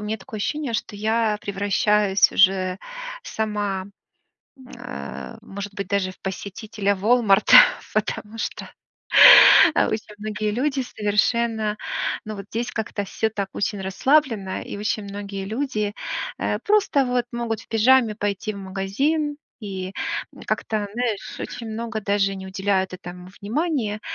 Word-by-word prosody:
у - - -8
меня 215 +1 -2
такое 215 +2 -10
ощущение, 290 +4 -2
что 210 - -3
я 220 0 0
превращаюсь 200 0 +2
уже 190 -1 +3 0.4
сама, 205 - -3 0.7
э 245 -2 -9
может 200 -1 -7
быть, 200 -2 -5
даже 200 -2 0
в - - -23
посетителя 200 +1 -3
"Волмарта", 215 -1 +5 0.4
потому 215 +1 -2
что - - -5 1.0
а, - - +3
осень 215 -1 -4
многие 210 0 -3
люди 270 +4 0
совершенно, 220 -1 0 0.5
ну 215 0 -6
вот, 200 -1 -8
здесь 235 +2 -3
как-то 220 -2 -3
всё 220 +3 -2
так 200 -3 -3
очень 205 0 -2
расслабленно, 210 0 +1
и - - -7
очень 210 0 -2
многие 200 -1 -6
люди, 215 -3 -2 0.4
э, - - -1
просто, 405 -10 +3
вот, 245 -1 0
могут 235 -2 -3
в - - -22
пижаме 230 0 +4
пойти 205 0 -2
в - - -8
магазин, 270 +11 -1 0.2
и, 190 -3 -5 0.4
м, - - -13
как-то, 215 -2 -1
знаешь, 235 -4 -3
очень 230 -2 -6
много 225 0 -4
даже 200 -1 +1
не 190 - -8
уделяют 190 0 -1
этому 180 0 -10
внимания. 225 -2 -1
210 Hz, 135 wpm, -23 LUFS, 200-230 Hz, 1.0 s, Волмарта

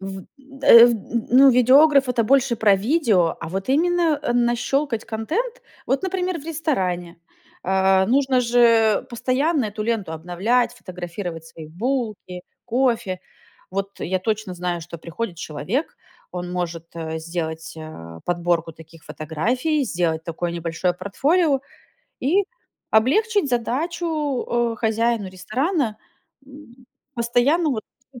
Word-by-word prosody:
В 195 -1 -7 0.2
д 270 +1 -10
э, 235 +1 +10
в - - +3
н 230 +1 -3
ну 270 +2 +7
видеограф- 270 +3 +5
это 235 -2 +1
больше 265 -1 +3
про 205 -2 +4
видео, 215 - +2
а 165 - -5
вот 195 +6 -4
именно, 330 +1 +2
э, 240 - 0
нащёлкать 240 +1 0
контент. 380 - -3 0.2
Вот, 275 - 0
например, 370 -3 -2
в - - -14
ресторане. 185 - -2 0.5
Э, 190 0 +3
нужно 265 +1 +2
же 230 -3 +4
постоянно 260 +3 0
эту 210 +1 -5
ленту 210 -7 -2
обновлять, 200 +10 0
фотографировать 175 -4 -7
свои 165 -1 -11
булки, 215 -2 -3 0.2
кофе. 230 -7 0 0.5
Вот 195 +1 -4
я 185 +2 -1
точно 215 -2 -2
знаю, 175 -1 -3
что 170 0 -9
приходит 170 +3 -5
человек, 170 - -3 0.4
он 180 0 -5
может, 170 -2 -4
э, 160 -1 -4
сделать, 160 -1 -5
э, 85 - -10
подборку 170 -2 0
таких 160 0 -16
фотографий, 245 - -1
сделать 170 -6 -1
такое 170 0 -3
небольшое 170 +1 -1
портфолио, 275 - +1 0.6
и 370 +10 +2 0.5
облегчить 370 - +2
задачу, 295 +3 -1 0.3
э, - - -13
хозяину 225 -1 0
ресторана, 230 - -1 0.5
м, 265 -3 -15 0.3
постоянно 250 +7 +2
вот, 220 -5 -3 0.3
ну, 245 - -12
225 Hz, 130 wpm, -22 LUFS, 180-270 Hz, 0.6 s, э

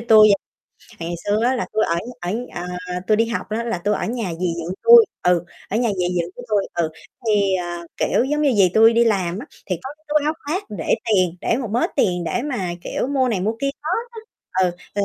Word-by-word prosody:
tui 220 -2 +7
vậy, 200 - +5 0.6
ngày 170 +1 -3
xưa 205 +2 +1
á 255 +2 +3
là 245 - -2
tui 220 - +2
ở 170 - 0 0.6
ở 175 - -4 0.2
ờ, 180 - -4
tui 215 - +4
đi 225 +1 +2
học 235 - -3
á 225 +2 -1
là 230 -6 -2
tui 205 +4 0
ở - - -2
nhà 225 -6 -3
dì 180 - +1
dượng 170 +2 -4
tui, 470 0 +9 0.2
ừ, 180 -1 +3 0.2
ở 210 - -1
nhà 240 0 +2
dì 180 - +1
dượng 170 +1 -4
của 245 - -9
tui, 210 -2 +1
ừ, 170 -2 0 0.4
thì, 200 -3 +3
ờ, 175 -1 -4
kiểu, - - +2
giống 295 +3 0
như 285 -3 +3
dì 200 -5 +5
tui 225 +1 +7
đi 235 +1 +4
làm 190 -5 0
á, 255 - -7 0.2
thì 185 - -1
có 265 - -6
cái 310 - -36
túi 300 0 +2
áo 305 - +2
khoác 350 +7 -1 0.2
để 160 - +2
tiền, 185 -6 +2
để - - +1
một 250 -3 -3
mớ 235 +3 +2
tiền 180 -2 +1
để 235 - -1
mà, 245 -11 -2
kiểu, - - -2
mua 265 -2 +1
này 215 -6 0
mua 210 +4 0
kia 275 0 +1
đó 310 - -3 0.2
đó. 450 - -8 0.4
Ừ, 180 - +2 0.2
rồi 200 0 +1
215 Hz, 245 wpm, -21 LUFS, 180-245 Hz, 0.6 s, tui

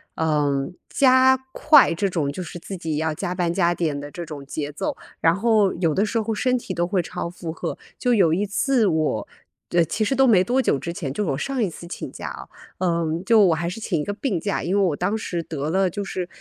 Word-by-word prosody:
嗯， 150 -1 0 0.2
加 260 0 +5 0.2
快 300 - +6
这 195 +4 0
种 155 -6 -1
就 185 - -6
是 175 - -8
自 190 +3 -7
己 160 -3 -3
要 160 0 0
加 180 +2 -3
班 175 -2 0
加 175 -2 +2
点 155 -4 -1
的 145 +1 -6
这 175 -1 -6
种 145 -3 -8
节 145 +1 -4
奏， 145 - -3 0.3
然 165 0 +4
后 215 -2 +3
有 165 -3 +1
的 200 +3 +2
时 225 +2 -1
候 220 +1 -2
身 255 +4 +1
体 195 -5 -5
都 175 0 0
会 185 -1 +1
超 170 - -5
负 170 -2 -6
荷。 - - -4 0.2
就 245 -1 +1
有 175 -7 +4
一 200 +4 +1
次 235 +3 +1
我 155 - 0 0.4
呃， 170 -1 +4
其 215 - -1
实 265 +6 0
都 270 +1 +5
没 190 -5 +5
多 250 +5 +1
久 140 - +1
之 170 - -4
前 155 -7 -4
就 210 - -1
我 135 - 0
上 270 - -2
一 190 - 0
次 170 - -10
请 - - -6
假 - - -7
啊， - - -8 0.3
嗯， 170 -1 0
就 225 +1 +5
我 165 -3 +3
还 170 +2 -2
是 200 - -6
请 175 -8 -1
一 - - -3
个 205 - -3
病 205 - -2
假， 200 +3 -2
因 180 +3 0
为 200 - +3
我 175 -6 +2
当 200 +7 -1
时 175 -5 -3
得 155 -2 -4
了 190 +2 +2
就 200 +4 -4
是 185 -2 -4
180 Hz, 265 characters per minute, -23 LUFS, 160-210 Hz, 0.4 s, 快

